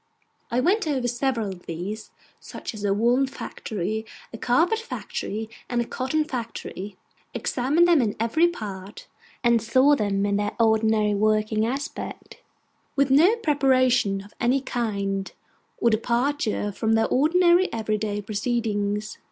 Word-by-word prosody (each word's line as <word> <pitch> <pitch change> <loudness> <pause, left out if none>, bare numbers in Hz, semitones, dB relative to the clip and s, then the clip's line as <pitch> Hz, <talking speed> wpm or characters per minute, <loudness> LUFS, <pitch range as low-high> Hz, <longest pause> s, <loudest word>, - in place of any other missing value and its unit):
I 240 - 0
went 375 +5 +2
over 265 -5 0
several 240 -3 -1
of 185 -2 -10
these; 185 +6 -5 0.3
such - - -8
as 210 -2 -8
a 200 - +1
woollen 240 +6 +2
factory, 220 -5 -4 0.3
a - - -5
carpet 330 - +2
factory, 220 - -5 0.2
and 245 - 0
a 235 - 0
cotton 265 +6 -1
factory: 230 -7 -6 0.4
examined 290 +8 +2
them 335 -5 +5
in 215 -4 -1
every 235 +10 +3
part; 200 - -7 0.4
and 235 -1 +4
saw 260 +6 +4
them 200 -4 0
in 200 0 +1
their 205 0 -1
ordinary 220 -2 +3
working 215 +1 +1
aspect, 275 +4 -6 0.5
with 275 -1 +2
no 335 +11 +6
preparation 255 - +2
of 205 - -16
any 250 +3 +3
kind, 200 -6 -2 0.4
or 235 - +2
departure 235 -1 0
from 220 +2 0
their 225 0 +3
ordinary 345 +6 +4
everyday 215 -2 -2
proceedings. 215 -2 -2
230 Hz, 135 wpm, -24 LUFS, 210-270 Hz, 0.5 s, no